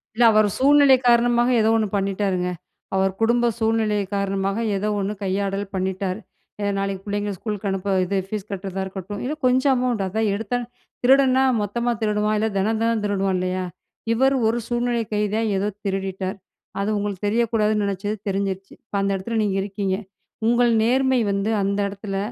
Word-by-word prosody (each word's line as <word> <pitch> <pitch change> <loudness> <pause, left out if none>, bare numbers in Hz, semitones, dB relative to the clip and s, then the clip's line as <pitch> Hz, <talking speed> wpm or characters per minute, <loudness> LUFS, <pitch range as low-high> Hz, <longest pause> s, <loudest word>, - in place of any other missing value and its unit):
இல்ல, 240 - +3
அவரு 215 -1 +4
சூழ்நிலை 280 0 +6
காரணமாக 240 0 +4
ஏதோ 220 - +3
ஒண்ணு 220 -1 +1
பண்ணிட்டாருங்க. 195 -2 0 0.5
அவர் 190 0 +2
குடும்ப 235 +1 +3
சூழ்நிலைய 220 -2 +1
காரணமாக 195 0 -1 0.2
ஏதோ 205 +2 -1
ஒண்ணு 200 +1 -1
கையாடல் 195 +1 -1
பண்ணிட்டாரு. 190 +1 -2 0.4
அ - - -1
நாளைக்கு 195 -1 -2
பிள்ளைங்கள 205 0 -2
ஸ்கூலுக்கு 210 0 -4
அனுப்ப, 195 +1 -1
இது 195 +2 -1
ஃபீஸ் 210 0 -5
கட்டுறதா 195 0 -4
இருக்கட்டும், 190 +1 -6
இல்ல 265 +4 -2
கொஞ்சம் 260 +2 +4
அமௌண்ட், 245 -5 0
அதான் 215 +3 0
எடுத்தாலும், 230 +3 -3 0.3
திருடன்னா 265 0 +5 0.2
மொத்தமாக 235 +4 -1
திருடுவான். 210 0 +1
இல்ல, 220 +1 +1
தினம் 215 +3 +1
தினம் 230 -1 +1
திருடுவான் 195 -2 0
இல்லையா? 185 0 -2 0.5
இவரு 265 +4 +3
ஒரு 225 +2 +1
சூழ்நிலை 240 -1 0
கைதியா 210 +1 0 0.2
ஏதோ 195 +2 0 0.2
திருடிட்டார். 195 0 -3 0.4
அது 200 +1 0
உங்களுக்கு 205 -1 -3
தெரியக்கூடாதுன்னு 215 -1 +1
நெனைச்சது, 200 +2 -2
தெரிஞ்சிருச்சு. 195 0 -3
இப்போ, 220 - -9
அந்த 195 0 +1
இடத்தில 225 +5 -3
நீங்க 195 -2 0
இருக்கீங்க. 195 -1 -2 0.5
உங்கள் 240 0 +4
நேர்மை 260 +2 +3
வந்து, 200 +2 0
அந்த 200 +1 0
இடத்தில 195 0 -5
205 Hz, 155 wpm, -23 LUFS, 195-230 Hz, 0.5 s, சூழ்நிலை